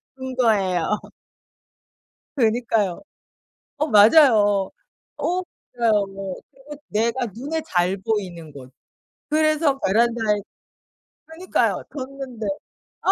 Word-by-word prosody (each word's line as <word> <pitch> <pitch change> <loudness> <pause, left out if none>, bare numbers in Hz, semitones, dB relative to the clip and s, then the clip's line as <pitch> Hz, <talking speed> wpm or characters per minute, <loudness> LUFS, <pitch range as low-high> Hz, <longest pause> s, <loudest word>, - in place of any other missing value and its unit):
둔 260 0 -6
거예요. 200 -5 +2 1.4
그니까요. 225 -5 +1 0.8
어 305 - +1
맞아요. 210 -4 +5 0.5
어 365 +1 -1 0.3
맞아요. 220 -4 +3 0.5
그리고 275 +2 -12
내가 235 +4 0
눈에 275 - -4
잘 180 - +1
보이는 185 -7 -4
곳. 130 -2 -12 0.6
그래서 310 -2 +2
베란다에 225 0 +2 0.9
그니까요. 330 +4 -1
뒀는데. 260 -4 -7 0.6
아 - - +3
230 Hz, 195 characters per minute, -22 LUFS, 205-275 Hz, 1.4 s, 맞아요